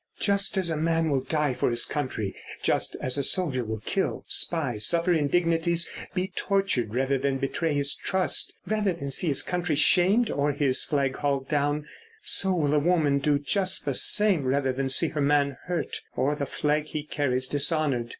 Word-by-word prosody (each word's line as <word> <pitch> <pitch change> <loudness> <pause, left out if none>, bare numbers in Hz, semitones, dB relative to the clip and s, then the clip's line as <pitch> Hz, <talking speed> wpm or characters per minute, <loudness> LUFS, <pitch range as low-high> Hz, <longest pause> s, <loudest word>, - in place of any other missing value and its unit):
Just 200 -1 +2
as 180 -3 +2
a 160 - -2
man 165 0 0
will 135 -2 +1
die 150 0 -1
for - - -1
his 120 0 +2
country, 120 -9 -4 0.3
just - - 0
as 130 +2 -1
a - - -1
soldier 140 -7 +1
will 110 -1 -5
kill, 195 - -2
spy, 140 -10 0
suffer 170 +10 +3
indignities, 170 +2 +1 0.3
be 185 0 -2
tortured, 190 - -1
rather 135 +1 0
than 135 0 -1
betray 145 +3 -2
his 140 0 +1
trust, 190 -1 +1
rather 210 -3 0
than 140 -5 -6
see 170 - +3
his 140 -4 +4
country 175 -3 -2
shamed 190 +9 +3
or 145 +1 0
his 140 -2 +2
flag 140 -3 -1
hauled 140 -2 -2
down, 145 0 -1 0.4
so 195 - +3
will 150 -5 0
a 150 - +3
woman 150 -3 +1
do 145 +1 +1
just 185 +6 0
the 140 - -1
same 200 +2 +4
rather 130 0 0
than 135 +1 -3
see 155 +4 +3
her 150 - -3
man 140 -1 +1
hurt 175 -1 -3
or 135 +3 0
the 145 -1 -4
flag 150 0 -1
he 155 -1 -5
carries 130 -4 -2
dishonoured. 145 -4 0
145 Hz, 185 wpm, -26 LUFS, 135-170 Hz, 0.4 s, his